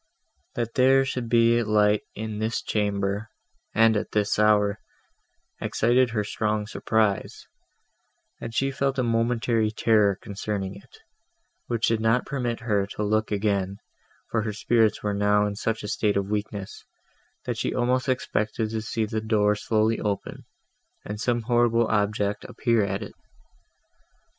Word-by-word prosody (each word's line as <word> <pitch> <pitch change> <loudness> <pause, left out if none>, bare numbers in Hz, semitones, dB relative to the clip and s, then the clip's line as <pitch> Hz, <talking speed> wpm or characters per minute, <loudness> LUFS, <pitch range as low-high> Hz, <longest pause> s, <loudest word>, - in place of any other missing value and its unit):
That 115 -1 -2
there 135 +1 +4
should 125 -3 -3
be 115 0 +4
light 105 -1 +3
in 110 0 -5
this 110 +1 -1
chamber, 100 0 -1 0.4
and 115 +1 +4
at 105 - -3
this 105 0 +1
hour, 105 -1 +3 0.8
excited 120 +2 +2
her 110 -2 -1
strong 105 0 -1
surprise, 110 -1 -1 0.9
and 115 - -6
she 135 +4 0
felt 135 0 -1
a 130 - +1
momentary 115 -1 +1
terror 105 -3 +2
concerning 100 -2 -4
it, 100 - -15 0.7
which 115 -1 0
did 115 -1 +1
not 115 +3 +2
permit 120 -4 -3
her 105 -4 0
to 105 - -4
look 110 +1 0
again, 100 -2 0 0.5
for 115 - +1
her 110 -1 -3
spirits 110 0 +1
were 105 -1 0
now 105 +1 +2
in 105 -1 -3
such 115 +1 -2
a - - -4
state 105 -1 0
of 100 +1 -2
weakness, 105 -2 -4 0.6
that - - -3
she - - -1
almost 125 +1 +1
expected 110 -3 -1
to 110 -1 -2
see 110 0 -2
the 110 0 -3
door 105 -1 +2
slowly 110 +1 +1
open, 100 -2 -4 0.6
and 105 0 -5
some 120 -1 +1
horrible 120 0 +3
object 105 -1 0
appear 115 -3 +1
at 100 +1 -2
it. - - -9
110 Hz, 150 wpm, -25 LUFS, 105-115 Hz, 0.9 s, there